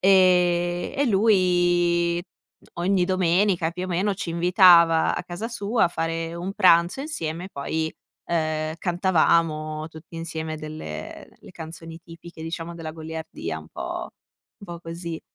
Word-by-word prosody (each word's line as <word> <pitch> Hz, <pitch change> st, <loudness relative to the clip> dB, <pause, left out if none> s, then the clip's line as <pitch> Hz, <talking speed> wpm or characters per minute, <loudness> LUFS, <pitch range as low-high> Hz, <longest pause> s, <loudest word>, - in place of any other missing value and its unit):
Ehm, 180 Hz, -2 st, +3 dB
e 285 Hz, -, +3 dB
lui, 175 Hz, -4 st, +3 dB, 0.4 s
mh, -, -, -24 dB, 0.2 s
ogni 185 Hz, -1 st, +2 dB
domenica, 185 Hz, -1 st, +2 dB
più 180 Hz, +2 st, -5 dB
o -, -, -4 dB
meno, 185 Hz, +3 st, 0 dB
ci 190 Hz, -2 st, -5 dB
invitava 170 Hz, -1 st, +5 dB
a -, -, -4 dB
casa 180 Hz, +6 st, -5 dB
sua 230 Hz, 0 st, 0 dB
a -, -, +3 dB
fare 165 Hz, 0 st, -3 dB
un 180 Hz, +3 st, -4 dB
pranzo 175 Hz, +2 st, +4 dB
insieme, 170 Hz, -, -4 dB
e -, -, -7 dB
poi, 160 Hz, +2 st, -3 dB, 0.3 s
ehm, 155 Hz, -1 st, -1 dB
cantavamo 165 Hz, -4 st, +1 dB
tutti 160 Hz, +1 st, -14 dB
insieme 160 Hz, -1 st, -4 dB
delle 150 Hz, -, -7 dB
le -, -, -14 dB
canzoni 165 Hz, 0 st, -9 dB
tipiche, 165 Hz, -1 st, -12 dB
diciamo, 165 Hz, +1 st, -5 dB
della 165 Hz, -2 st, -6 dB
goliardia, 160 Hz, -, -6 dB
un 80 Hz, 0 st, -13 dB
po' -, -, -5 dB, 0.5 s
un -, -, -15 dB
po' -, -, -14 dB
così. 170 Hz, -1 st, -6 dB
170 Hz, 145 wpm, -24 LUFS, 160-180 Hz, 0.5 s, invitava